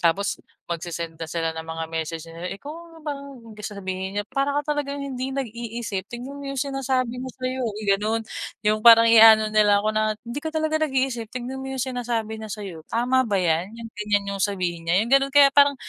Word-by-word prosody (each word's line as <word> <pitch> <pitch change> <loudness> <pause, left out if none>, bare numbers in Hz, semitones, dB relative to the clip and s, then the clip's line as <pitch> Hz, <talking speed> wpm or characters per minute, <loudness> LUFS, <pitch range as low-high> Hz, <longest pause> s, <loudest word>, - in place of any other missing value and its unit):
Tapos 190 +4 +1 0.3
magse-send 170 -1 -4
na 165 - -4
sila 165 0 -1
ng 160 0 -7
mga 160 0 -4
message 160 0 -4
nila, 165 +2 -7
"Ikaw, 325 +5 -11
parang," 280 -4 -6 0.2
sasabihin 190 -2 -5
niya, 205 - +1
"Para 275 +1 0
ka 300 - -4
talagang 285 -1 -3
hindi 265 -1 -4
nag-iisip, 235 -5 -4
tingnan 255 +4 -7
mo - - -8
yung 275 - -4
sinasabi 260 -3 -1
niya 260 - -5
sa'yo." 255 0 -3
Yung 210 0 -6
ganun, 220 +2 -1 0.4
yung 215 +1 +3
parang 230 0 +9
ia-ano 220 -1 +8
nila 205 -1 +4
ako 215 - +1
na, 215 0 +1
"Hindi 235 +4 -5
ka 315 - -3
talaga 315 0 +1
nag-iisip, 265 -6 0
tingnan 255 +2 -5
mo 265 - -6
yung 260 - -1
sinasabi 235 -4 -2
niya 220 - -6
sa'yo, 195 -5 -6
tama 250 +2 +2
ba 205 - 0
yan? 175 +2 0
Yung 225 - -8
ganyan 210 -1 +1
yung 195 - -4
sabihin 180 -4 -1
niya?" 185 +4 +4
Yung 235 - -6
ganun 275 0 +4
kaya 280 -1 +8
parang 285 0 +6
225 Hz, 200 wpm, -24 LUFS, 195-265 Hz, 0.4 s, parang